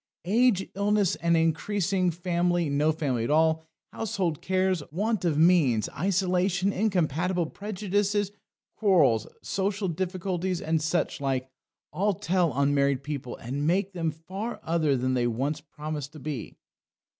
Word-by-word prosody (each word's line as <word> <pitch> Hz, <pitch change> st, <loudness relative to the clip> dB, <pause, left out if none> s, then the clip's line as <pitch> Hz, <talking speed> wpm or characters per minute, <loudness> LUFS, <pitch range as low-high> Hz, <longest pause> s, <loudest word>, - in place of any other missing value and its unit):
Age, 215 Hz, 0 st, +3 dB
illness, 200 Hz, -1 st, +2 dB
an 170 Hz, 0 st, +2 dB
increasing 180 Hz, +3 st, +1 dB
family, 175 Hz, -1 st, 0 dB
no 150 Hz, +2 st, +3 dB
family 135 Hz, -7 st, -1 dB
at 115 Hz, -, -2 dB
all, 160 Hz, +1 st, +2 dB, 0.3 s
household 185 Hz, -8 st, -2 dB
cares, 185 Hz, -2 st, +1 dB
want 210 Hz, +4 st, -1 dB
of 165 Hz, -4 st, +1 dB
means, 155 Hz, -, +4 dB
isolation, 185 Hz, +1 st, +1 dB
incompatible 180 Hz, -3 st, +1 dB
prejudices, 205 Hz, +2 st, -1 dB, 0.5 s
quarrels, 175 Hz, -, +3 dB, 0.2 s
social 195 Hz, +1 st, -1 dB
difficulties, 185 Hz, +1 st, -2 dB
and 160 Hz, 0 st, 0 dB
such 160 Hz, -1 st, -1 dB
like, 130 Hz, -1 st, -1 dB, 0.4 s
all 200 Hz, +5 st, +1 dB
tell 175 Hz, -1 st, +1 dB
on 140 Hz, +2 st, +1 dB
married 140 Hz, -1 st, +2 dB
people, 140 Hz, -4 st, -5 dB
and 140 Hz, +5 st, -3 dB
make 190 Hz, +3 st, +1 dB
them 165 Hz, -3 st, -1 dB
far 185 Hz, +9 st, -6 dB
other 160 Hz, -4 st, +1 dB
than 130 Hz, +1 st, 0 dB
they 120 Hz, -1 st, +1 dB
once 135 Hz, +6 st, -2 dB
promised 150 Hz, -1 st, -6 dB
to 155 Hz, -, -10 dB
be." 145 Hz, -5 st, -6 dB
170 Hz, 135 wpm, -27 LUFS, 150-190 Hz, 0.5 s, means